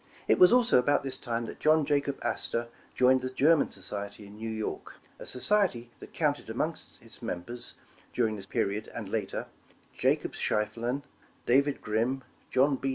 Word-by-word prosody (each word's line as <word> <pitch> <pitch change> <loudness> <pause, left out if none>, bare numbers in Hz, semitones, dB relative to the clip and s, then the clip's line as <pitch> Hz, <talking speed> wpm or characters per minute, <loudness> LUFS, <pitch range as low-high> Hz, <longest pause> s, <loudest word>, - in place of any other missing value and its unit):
It - - +4
was 180 +2 +8
also 245 - +6
about 145 +3 +2
this 135 -1 -3
time, 120 -2 -3
that - - -8
John 155 -1 +4
Jacob 140 -1 0
Astor 115 0 -1 0.3
joined 130 +1 +5
the 130 - -3
German 145 +4 +4
Society 100 +1 -6
in 100 +1 -12
New 110 +1 -5
York, 110 -1 -4 0.2
a - - -8
society 125 - +2
that - - -11
counted - - -1
among - - -1 0.3
its - - -7
members, 120 +8 -5 0.4
dur 120 - +1
ing 110 - -3
this 95 -2 -7
period 100 +3 -1
and 110 -4 -5
later, 100 -1 -3 0.5
Jacob - - +1
Schieffelin, 115 +6 -1 0.4
David 140 +3 +3
Grim, 120 +5 0 0.3
John 135 +1 +3
B. 135 - -2
125 Hz, 165 wpm, -29 LUFS, 110-140 Hz, 0.5 s, was